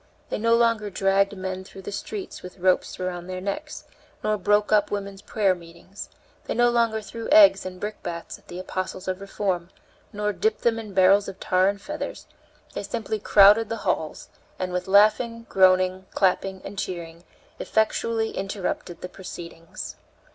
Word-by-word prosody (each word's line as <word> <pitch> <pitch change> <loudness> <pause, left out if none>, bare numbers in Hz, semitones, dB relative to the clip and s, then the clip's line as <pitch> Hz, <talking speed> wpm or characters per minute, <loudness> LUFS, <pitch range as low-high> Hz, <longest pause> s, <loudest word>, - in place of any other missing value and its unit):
They - - -1
no 230 +1 +4
longer 230 -3 +2
dragged 195 +1 +1
men 185 0 -4
through 190 0 -12
the - - -6
streets 390 - -6
with 180 +1 -10
ropes 185 0 +1
around 180 -1 -4
their 185 0 -4
necks, 300 +12 -5 0.4
nor 215 - +2
broke 205 +2 +2
up 210 -1 +4
women's 200 -1 -4
prayer 205 -2 +1
meetings; 170 +3 -11 0.4
they - - -3
no 240 +1 +4
longer 230 -2 +1
threw 225 +3 -7
eggs 295 -12 +7
and 185 0 -8
brickbats 175 -5 -6
at - - -29
the 175 - -8
apostles 185 0 -5
of 185 +1 -2
reform, 190 -3 -2 0.4
nor 210 0 -1
dipped 440 - 0
them 230 -1 +2
in 210 -4 -9
barrels 195 +2 +5
of 195 - -8
tar 185 +1 +2
and 200 0 -5
feathers, 300 +1 -5 0.5
they - - -3
simply 220 -2 -3
crowded 210 +2 +6
the 230 - -2
halls, 160 -4 -2 0.3
and, 185 -1 -3
with 180 0 -2
laughing, 225 +4 +4
groaning, 185 0 +3
clapping, 190 0 +1
and 195 0 -6
cheering, 170 -2 -5 0.4
effectually 220 +1 0
interrupted 195 -3 -4
the - - -4
proceedings. 170 -3 -9
195 Hz, 165 wpm, -25 LUFS, 185-215 Hz, 0.5 s, eggs